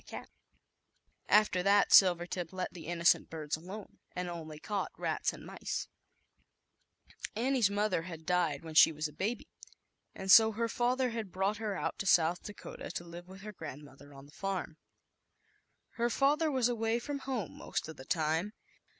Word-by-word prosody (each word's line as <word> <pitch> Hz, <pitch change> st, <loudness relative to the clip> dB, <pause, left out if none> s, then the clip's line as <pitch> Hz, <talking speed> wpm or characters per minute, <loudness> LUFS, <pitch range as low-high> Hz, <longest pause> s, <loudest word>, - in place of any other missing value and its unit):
15 -, -, -8 dB, 1.0 s
After 210 Hz, -3 st, +4 dB
that 200 Hz, +2 st, +4 dB
Silvertip 175 Hz, -2 st, +4 dB
let 185 Hz, -1 st, -4 dB
the 165 Hz, -3 st, -9 dB
innocent 170 Hz, 0 st, +3 dB
birds 155 Hz, -2 st, -3 dB
alone 185 Hz, +6 st, -10 dB, 0.2 s
and 180 Hz, -1 st, -3 dB
only 160 Hz, -3 st, -7 dB
caught 205 Hz, +4 st, -3 dB
rats -, -, -1 dB
and -, -, -11 dB
mice, -, -, -4 dB, 1.5 s
Annie's 245 Hz, -2 st, +2 dB
mother 205 Hz, -3 st, 0 dB
had 165 Hz, -2 st, -9 dB
died 170 Hz, -5 st, 0 dB
when 160 Hz, -1 st, -8 dB, 0.2 s
was 155 Hz, +1 st, -1 dB
a 150 Hz, -, -14 dB
baby, 210 Hz, +9 st, -3 dB, 0.7 s
and 190 Hz, 0 st, -1 dB
so 220 Hz, +1 st, +8 dB
her 230 Hz, +2 st, -1 dB
fathe 240 Hz, -2 st, -1 dB
brought 195 Hz, +3 st, 0 dB
her 215 Hz, -2 st, -3 dB
out -, -, -3 dB
to 195 Hz, -, -3 dB
South 175 Hz, -1 st, +4 dB
Dakota 210 Hz, -, -8 dB, 0.4 s
with 190 Hz, +1 st, -12 dB
her 210 Hz, +1 st, -8 dB
grandmother 145 Hz, -3 st, -10 dB
on 135 Hz, 0 st, -13 dB
the 145 Hz, -, -17 dB
farm. 190 Hz, -3 st, -4 dB, 1.2 s
Her 235 Hz, 0 st, +1 dB
father 295 Hz, +6 st, +2 dB
was 260 Hz, -4 st, +2 dB
away 225 Hz, -1 st, 0 dB
from 280 Hz, +4 st, -4 dB
home/most 255 Hz, -, -4 dB
of 160 Hz, -2 st, -9 dB
the 130 Hz, -, -9 dB
time. 160 Hz, +7 st, 0 dB
190 Hz, 150 wpm, -32 LUFS, 165-220 Hz, 1.5 s, so